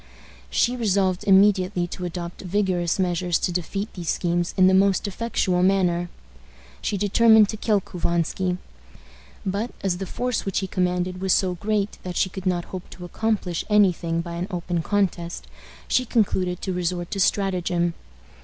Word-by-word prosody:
She 245 - +2
resolved 195 -5 +1
immediately 190 -2 +4
to 180 - -5
adopt 175 0 -6
vigorous 185 -3 0
measures 180 -2 +1
to 180 - -1
defeat 195 +4 -3
these 175 -3 -5
schemes 175 0 0
in 185 - +6
the 190 - +5
most 195 +1 +3
effectual 190 -3 0
manner. 180 -2 +2 0.7
She 205 - -1
determined 215 +1 +5
to 215 - -4
kill 210 -2 +1
Couvansky. 180 +1 -1 0.9
But, 200 +5 -1
as 185 -2 0
the 195 - -4
force 250 +4 -2
which 195 - -2
he 195 - 0
commanded 180 0 -1
was 190 -1 +2
so 185 -2 +2
great 205 +3 -2
that 180 -1 -6
she 190 - +1
could 190 0 -5
not 175 -2 0
hope 185 -1 -6
to 180 - -9
accomplish 195 -3 -1
any 205 -3 +5
thing 165 0 -2
by 170 0 -7
an 175 +2 -3
open 175 -2 -2
contest, 175 -3 -1 0.4
she 255 - +2
concluded 185 -6 0
to 190 - -2
resort 175 -1 -2
to 200 - -3
stratagem. 180 -3 +1
185 Hz, 165 wpm, -24 LUFS, 175-200 Hz, 0.9 s, in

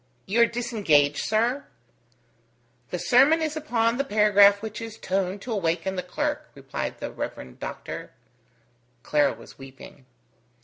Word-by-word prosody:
"You 225 +5 +2
are 235 - +6
disengaged, 205 - +1
sir?" 235 +6 0 1.2
"The - - -3
sermon 275 +6 +4
is 315 -1 -2
upon 240 -6 0
the - - +2
paragraph 205 -3 +5
which 220 0 -6
is 225 -1 -7
toned 190 0 -2
to 250 - -6
awaken 185 -2 -1
the 180 - -2
clerk," 180 - -3
replied - - -5
the - - -5
Rev. 65 -1 -7
Doctor. - - -6 0.9
Clara 145 -1 +2
was 115 +4 -15
weeping. 135 0 -13
210 Hz, 135 wpm, -25 LUFS, 175-235 Hz, 1.2 s, are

